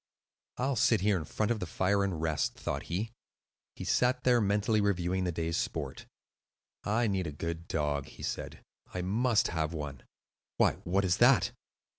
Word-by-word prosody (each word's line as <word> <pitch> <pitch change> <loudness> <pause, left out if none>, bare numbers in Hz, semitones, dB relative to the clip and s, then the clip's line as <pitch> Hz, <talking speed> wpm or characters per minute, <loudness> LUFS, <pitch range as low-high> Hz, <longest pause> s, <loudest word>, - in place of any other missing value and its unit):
"I'll 135 +2 0
sit 110 -1 +4
here 105 0 +3
in 80 -4 -2
front 110 +8 -1
of 115 - 0
the 90 - -4
fire 100 +3 +1
and 95 -5 -1
rest," 80 -3 0
thought - - -3
he. 105 +7 -2 0.6
He - - -6
sat 125 +1 +2
there 125 -2 +4
mentally 105 +1 +2
reviewing 95 -2 0
the 90 - 0
day's 85 0 -2
sport. - - -3 0.8
"I 115 +3 +1
need 95 -5 0
a - - -4
good 85 +3 -5
dog," 75 -2 -1
he - - -12
said. - - -4 0.3
"I 90 - -1
must 115 +5 +2
have 80 -1 -1
one. 75 -5 -5 0.6
Why, - - +3
what 95 +3 +2
is 90 -2 +2
that?" - - +5
95 Hz, 175 wpm, -31 LUFS, 80-105 Hz, 0.8 s, that